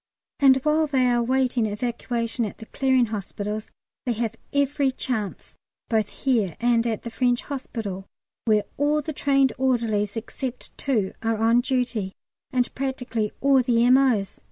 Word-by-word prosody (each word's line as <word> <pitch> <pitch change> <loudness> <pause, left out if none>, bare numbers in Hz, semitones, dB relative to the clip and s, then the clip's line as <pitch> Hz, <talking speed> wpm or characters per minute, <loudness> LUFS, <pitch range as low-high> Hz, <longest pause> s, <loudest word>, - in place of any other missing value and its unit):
And 270 -2 +6
while 305 +1 +3
they 265 -3 +2
are 245 -1 +3
awaiting 250 -1 +1
evacuation 235 +2 -2
to 205 - -6
the 220 - -10
Clearing 260 0 +2
Hospitals 210 0 -4 0.4
they 240 - +2
have 230 0 -2 0.2
every 280 0 +2
chance, 240 -6 -4 0.4
both 220 -3 +1
here 225 - 0
and 235 0 +2
at 220 -2 -2
the 235 - -6
French 245 +1 +1
Hospital, 220 -9 -5 0.4
where 215 -2 +3
all 295 +1 +2
the 315 - -4
trained 275 -3 +2
orderlies 230 -5 +1
except 250 +2 -6
two 220 -9 0
are 225 -1 0
on 230 +2 +4
duty, 245 -7 -1 0.4
and 250 -2 0
practically 250 -5 -2
all 275 -1 +5
the 240 -1 +3
M.O.'s. 250 -6 +3
240 Hz, 150 wpm, -24 LUFS, 220-265 Hz, 0.4 s, And